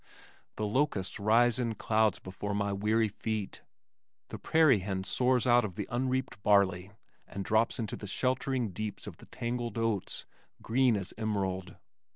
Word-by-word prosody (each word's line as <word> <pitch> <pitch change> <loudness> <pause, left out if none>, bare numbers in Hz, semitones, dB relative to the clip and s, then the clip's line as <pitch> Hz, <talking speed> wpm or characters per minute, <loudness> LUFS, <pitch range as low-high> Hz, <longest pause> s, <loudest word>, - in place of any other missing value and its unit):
The 110 - -2
locusts 105 -4 0
rise 115 +3 +3
in 115 -3 -1
clouds 110 0 +2
before 100 +2 -5
my 100 -1 0
weary 110 +2 +1
feet. 105 0 -4 0.7
The - - -7
prairie 155 -8 +4
hen 95 0 -3
soars 125 +4 +1
out 120 -1 +5
of 100 -5 -5
the - - -4
unreaped 130 -4 -1
barley 100 -3 +3 0.4
and 100 -1 -6
drops 110 +1 +2
into 110 -4 -3
the 105 - -8
sheltering 125 +1 0
deeps 105 +3 -5
of - - -8
the - - -15
tangled 120 0 -4
oats, 115 -4 -2 0.3
green 125 -1 +2
as 95 -2 -5
emerald. 95 -4 -2
110 Hz, 155 wpm, -30 LUFS, 100-120 Hz, 0.7 s, out